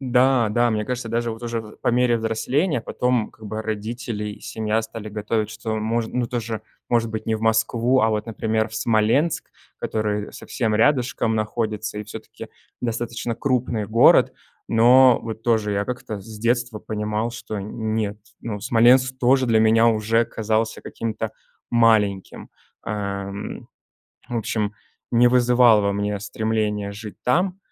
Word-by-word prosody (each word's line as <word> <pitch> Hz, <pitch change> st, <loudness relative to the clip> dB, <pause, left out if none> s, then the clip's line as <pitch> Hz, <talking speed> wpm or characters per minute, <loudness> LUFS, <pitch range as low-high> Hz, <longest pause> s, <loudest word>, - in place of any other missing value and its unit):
Да, 125 Hz, -2 st, +3 dB
да, 120 Hz, +3 st, +2 dB
мне 105 Hz, -1 st, -1 dB
кажется, 125 Hz, -1 st, -4 dB
даже 115 Hz, +1 st, -1 dB
вот 115 Hz, +1 st, -8 dB
уже 115 Hz, -1 st, -2 dB
в 110 Hz, -1 st, -12 dB
по -, -, -2 dB
мере 120 Hz, 0 st, +3 dB
взросления 125 Hz, +7 st, 0 dB
потом, 125 Hz, -1 st, -1 dB
как 110 Hz, -, -13 dB
бы, 110 Hz, +1 st, -4 dB
родители 110 Hz, +1 st, -4 dB
и -, -, -11 dB
семья 110 Hz, 0 st, -1 dB
стали 110 Hz, -1 st, -7 dB
готовить, 105 Hz, +1 st, -2 dB
что 110 Hz, 0 st, -4 dB
можн 110 Hz, +1 st, -1 dB
ну, 125 Hz, -1 st, 0 dB
тоже, 115 Hz, -2 st, -4 dB, 0.3 s
может 115 Hz, -1 st, +2 dB
быть 110 Hz, 0 st, -4 dB
не 110 Hz, -1 st, +1 dB
в -, -, -9 dB
Москву, 115 Hz, +3 st, +2 dB
а 110 Hz, 0 st, +3 dB
вот, 105 Hz, 0 st, -2 dB
например, 110 Hz, 0 st, -1 dB
в 110 Hz, -, -11 dB
Смоленск, 115 Hz, +8 st, +1 dB, 0.3 s
который 105 Hz, -1 st, -2 dB
совсем 110 Hz, -4 st, -2 dB
рядышком 120 Hz, -2 st, +2 dB
находится 110 Hz, -1 st, -2 dB
и -, -, -3 dB
всё-таки 110 Hz, +1 st, -10 dB, 0.3 s
достаточно 115 Hz, 0 st, -3 dB
крупный 125 Hz, -5 st, -1 dB
город. 115 Hz, +3 st, +5 dB, 0.4 s
Но 125 Hz, +2 st, +6 dB
вот 110 Hz, -1 st, -6 dB
тоже 110 Hz, -3 st, +1 dB
я 100 Hz, 0 st, 0 dB
как-то 110 Hz, -4 st, -5 dB
с 110 Hz, +2 st, -10 dB
детства 120 Hz, 0 st, 0 dB
понимал, 105 Hz, +1 st, -2 dB
что 115 Hz, -4 st, -6 dB
нет, 110 Hz, 0 st, -3 dB, 0.2 s
ну, 105 Hz, -3 st, -4 dB
Смоленск 125 Hz, +4 st, +4 dB
тоже 130 Hz, +1 st, +3 dB
для 110 Hz, -2 st, +3 dB
меня 115 Hz, +1 st, +5 dB
уже 115 Hz, +1 st, +2 dB
казался 110 Hz, 0 st, -1 dB
каким-то 110 Hz, -1 st, -4 dB, 0.4 s
маленьким. 110 Hz, -5 st, +2 dB, 0.3 s
Эм, 100 Hz, -1 st, -5 dB, 0.6 s
в 120 Hz, -, -3 dB
общем, 105 Hz, -1 st, -2 dB, 0.4 s
не 120 Hz, 0 st, +5 dB
вызывал 120 Hz, -3 st, +5 dB
во 100 Hz, 0 st, +1 dB
мне 105 Hz, 0 st, -2 dB
стремления 105 Hz, -1 st, -2 dB
жить 105 Hz, 0 st, -9 dB
там. 180 Hz, +9 st, +1 dB
110 Hz, 155 wpm, -22 LUFS, 110-120 Hz, 0.6 s, Но